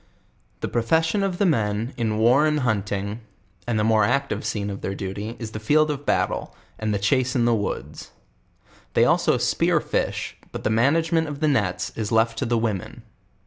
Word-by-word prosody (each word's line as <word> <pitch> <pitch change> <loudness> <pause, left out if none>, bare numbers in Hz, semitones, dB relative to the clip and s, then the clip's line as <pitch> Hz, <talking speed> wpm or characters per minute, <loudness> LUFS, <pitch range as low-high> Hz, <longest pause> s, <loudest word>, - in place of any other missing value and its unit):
The - - -1
profession 160 - +1
of 195 -2 -1
the 200 - +2
men 110 - 0
in 110 -3 -1
war 125 +7 +4
and 150 -1 +1
hunting, 105 -2 -2 0.5
and 120 -2 0
the 105 - +1
more 110 -1 +4
active 125 -1 0
scene 105 -1 -2
of 100 - -7
their 95 - -3
duty 100 +4 -5
is 115 -2 -6
the 110 - -5
field 150 +7 +3
of 145 0 -6
battle, - - 0 0.2
and 110 -1 -1
the 105 - +1
chase 130 +6 +1
in 120 -2 +2
the 120 - +3
woods. 105 -3 -4 0.9
They - - +5
also - - +3
spear - - +2
fish, - - -2
but - - -6
the - - +1
manage 145 +9 +2
ment 165 -1 +2
of 145 -1 -6
the 155 - +1
nets 105 -11 0
is 110 -2 -3
left 115 0 +2
to - - -1
the 120 0 +1
women. 110 -5 -3
115 Hz, 195 wpm, -24 LUFS, 105-140 Hz, 0.9 s, They